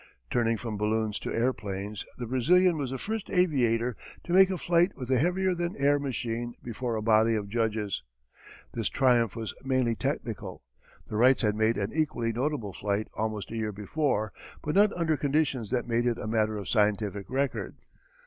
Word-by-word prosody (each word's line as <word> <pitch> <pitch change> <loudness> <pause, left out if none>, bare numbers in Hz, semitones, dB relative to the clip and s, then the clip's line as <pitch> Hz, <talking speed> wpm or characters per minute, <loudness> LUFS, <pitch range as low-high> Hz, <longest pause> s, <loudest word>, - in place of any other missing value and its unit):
Turning 115 -1 +2
from 110 -1 -5
balloons 110 0 0
to - - -5
airplanes 105 -4 -2
the 120 - -4
Brazilian 170 +9 +4
was 140 -4 -2
the 135 - -3
first 220 +7 -4
aviator 125 - +2 0.3
to 175 - -3
make 190 0 +7
a 190 - -1
flight 175 +2 +3
with 130 -1 -5
a 130 - +4
heavier 180 +5 +2
than 175 0 -2
air 145 +1 +3
machine 120 -3 -3
before 120 0 -3
a 110 - -2
body 110 +1 +4
of 105 -2 -2
judges. 110 -3 -1 0.7
This 115 -4 -1
triumph 120 -5 +3
was 115 -2 -4
mainly 130 -3 +1
technical. 110 - -4 0.4
The 105 - -4
Wrights 125 +3 +5
had 105 -1 +3
made 110 +1 +2
an 100 +1 -2
equally 145 -7 0
notable 120 -5 -2
flight 100 +5 -2
almost 110 -1 -3
a - - -4
year 110 -1 -1
before 110 +1 -1 0.3
but 150 - -1
not 205 +1 +5
under 165 -2 +1
conditions 140 -6 0
that 125 -1 -1
made 120 +1 +1
it 120 -1 +1
a - - -5
matter 110 -1 +1
of 100 - -6
scientific 105 -2 0
record. 135 +1 -1
120 Hz, 180 wpm, -28 LUFS, 110-145 Hz, 0.7 s, make